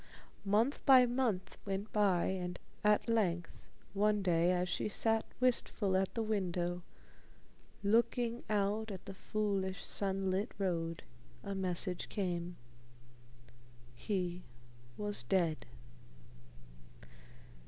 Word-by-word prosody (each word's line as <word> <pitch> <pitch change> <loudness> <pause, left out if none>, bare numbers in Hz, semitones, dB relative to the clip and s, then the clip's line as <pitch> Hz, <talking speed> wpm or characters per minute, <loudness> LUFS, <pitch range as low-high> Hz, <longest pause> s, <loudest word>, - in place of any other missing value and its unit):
Month 220 +8 +2
by 260 -3 +8
month 240 -6 -1
went 200 +1 -4
by, 195 -5 +3
and 180 -1 -2 0.3
at 210 +2 +3
length 180 -7 0 0.3
one 205 0 +2
day, 170 -1 +3
as 180 0 +1
she 180 - -1
sat 225 +1 +1
wistful 235 -5 +2
at 190 0 +2
the 230 - 0
window, 180 -4 -1 1.0
looking 235 +3 +2
out 210 +1 +1
at 190 -3 -7
the 195 - -7
foolish 195 -2 -2
sunlit 195 +1 0
road, 165 -4 -1 0.4
a 200 - -4
message 185 -1 -2
came. 175 -3 -2 1.4
He 180 - -2 0.6
was 205 -7 -3
dead. 165 +4 0
195 Hz, 100 wpm, -35 LUFS, 180-215 Hz, 1.4 s, by